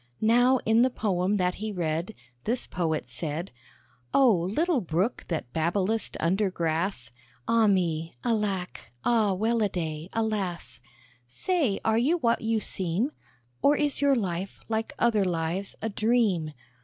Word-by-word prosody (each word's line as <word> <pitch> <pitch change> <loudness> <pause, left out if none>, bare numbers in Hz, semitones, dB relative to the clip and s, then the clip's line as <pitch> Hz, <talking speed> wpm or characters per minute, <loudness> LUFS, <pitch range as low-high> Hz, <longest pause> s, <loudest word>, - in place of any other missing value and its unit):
Now 245 +4 +4
in 225 +1 +4
the 255 - +5
poem 200 -4 0
that 180 -1 +1
he 215 0 -2
read, 170 +2 -2 0.3
This 240 +3 +1
Poet 160 -7 -2
said 150 +7 -4 0.6
"Oh! 260 -6 +6 0.2
little 320 - +1
Brook 180 +6 -1
that 155 -8 -4
babblest 190 +6 0
under 190 +4 +1
grass! 165 - -1 0.4
(Ah 230 -1 +4
me! 165 -6 0
Alack! 200 - -2
Ah, 220 -4 +3
well 225 +4 +1
a 210 - +2
day! 160 -2 -4
Alas!) 210 - -2 0.5
Say, 270 - 0
are 220 0 +3
you 300 +9 +2
what 235 -7 +1
you 225 0 +1
seem? 195 - -2 0.5
Or 290 - +5
is 290 -2 0
your 280 -1 +4
life, 190 -4 -3
like 225 0 -2
other 220 -4 +3
lives, 175 +2 -2
a 225 - 0
dream? 210 -8 +1
200 Hz, 145 wpm, -27 LUFS, 170-230 Hz, 0.6 s, Oh